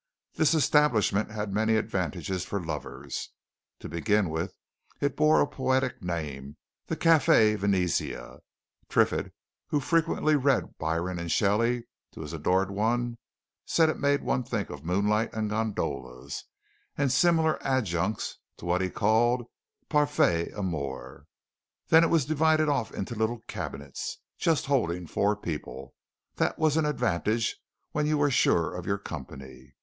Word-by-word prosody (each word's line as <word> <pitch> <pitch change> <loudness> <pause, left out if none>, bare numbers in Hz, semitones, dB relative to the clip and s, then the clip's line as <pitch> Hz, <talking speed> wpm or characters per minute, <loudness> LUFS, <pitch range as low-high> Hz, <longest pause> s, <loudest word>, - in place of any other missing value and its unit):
This 155 0 +3
establishment 125 -10 +3
had 105 -2 -4
many 110 +2 +2
advantages 95 -3 -2
for 100 - -3
lovers. 80 -3 -5 0.5
To - - -6
begin 95 +2 +1
with, 80 +4 -3 0.4
it 140 -1 0
bore 155 +1 +4
a - - +4
poetical 130 -7 -1
name 75 -4 -4 0.3
the - - -2
Café 160 -10 +5
Venezia 95 - -1 0.5
Triffitt, - - +2 0.4
who 150 - +1
frequently 160 0 +2
read 140 -2 +1
Byron 85 +3 -1
and 85 -1 -4
Shelley 115 +4 +2 0.3
to - - -9
his 75 +1 -7
adored 90 +5 +1
one, 120 +3 0 0.4
said 160 -1 +3
it - - -2
made 140 0 +2
one 125 - +1
think 115 -4 -3
of 75 -1 -8
moonlight 105 +6 +1
and 110 -1 -2
gondolas, 95 - -3 0.5
and 140 -2 +1
similar 160 +2 +3
adjuncts 105 -7 -1 0.2
to - - -10
what 90 +1 +1
he 95 - 0
called 120 +5 +2 0.4
parfaite 145 - +2
amour. 75 -10 -5 0.6
Then 160 +1 +7
it - - +4
was 165 -5 +3
divided 155 0 +3
off 140 -6 0
into 100 +5 -4
little 110 +1 -1
cabinets, 70 0 -5 0.2
just 165 -3 +2
holding 90 -11 0
four 100 +6 +1
people 75 -8 -6 0.4
that - - 0
was 155 -2 +2
an 160 -2 +2
advantage 115 -4 0 0.4
when 150 0 0
you 155 0 +2
were 145 -1 +2
sure 85 - +2
of 90 -1 -6
your 100 - +1
company. 70 -6 -9
110 Hz, 140 wpm, -28 LUFS, 85-140 Hz, 0.6 s, Then